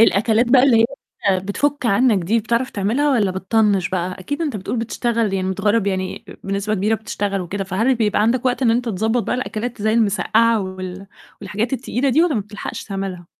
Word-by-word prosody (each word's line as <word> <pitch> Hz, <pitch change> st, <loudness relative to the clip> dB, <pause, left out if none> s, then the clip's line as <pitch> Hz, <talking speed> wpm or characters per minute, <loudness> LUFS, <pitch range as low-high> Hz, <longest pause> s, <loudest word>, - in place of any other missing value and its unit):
الأكلات 225 Hz, +2 st, +4 dB
بقى 255 Hz, -1 st, +6 dB
اللي 260 Hz, -4 st, +5 dB
هي -, -, +4 dB, 0.5 s
بتفُك 265 Hz, +7 st, -1 dB
عنك 215 Hz, -2 st, +3 dB
دي 225 Hz, +6 st, +2 dB
بتعرف 235 Hz, +4 st, -1 dB
تعملها 235 Hz, +9 st, 0 dB
والّا 210 Hz, -6 st, +2 dB
بتطنّش 195 Hz, 0 st, +1 dB
بقى؟ 185 Hz, 0 st, -2 dB
أكيد 285 Hz, -, -3 dB
أنت 285 Hz, -9 st, -2 dB
بتقول 200 Hz, +5 st, -4 dB
بتشتغل 230 Hz, -1 st, -1 dB
يعني 185 Hz, -1 st, -1 dB
متغرّب، 205 Hz, +2 st, +1 dB
يعني 190 Hz, -1 st, -3 dB
أ -, -, -9 dB
بنسبة 200 Hz, +2 st, -1 dB
كبيرة 210 Hz, +3 st, +1 dB
بتشتغل 205 Hz, -2 st, -3 dB
وكده 195 Hz, +3 st, -4 dB
فهل 220 Hz, +8 st, +1 dB
بيبقى 210 Hz, -3 st, +1 dB
عندك 235 Hz, +3 st, +1 dB
وقت 255 Hz, +1 st, 0 dB
إن 230 Hz, -, +4 dB
أنت 240 Hz, +2 st, +1 dB
تضبّط 220 Hz, +4 st, 0 dB
بقى -, -, -2 dB
الأكلات 230 Hz, -1 st, -4 dB
زي 220 Hz, +1 st, +2 dB
المِسقّعة 225 Hz, +1 st, +2 dB
وال 185 Hz, 0 st, -6 dB, 0.3 s
والحاجات 220 Hz, +5 st, -3 dB
التقيلة 265 Hz, +1 st, -1 dB
دي 280 Hz, +6 st, +4 dB
والّا 340 Hz, -5 st, +2 dB
ما 215 Hz, -, +1 dB
بتلحقش 205 Hz, +1 st, -7 dB
تعملها؟ 195 Hz, -3 st, -5 dB
215 Hz, 195 wpm, -20 LUFS, 195-240 Hz, 0.5 s, بقى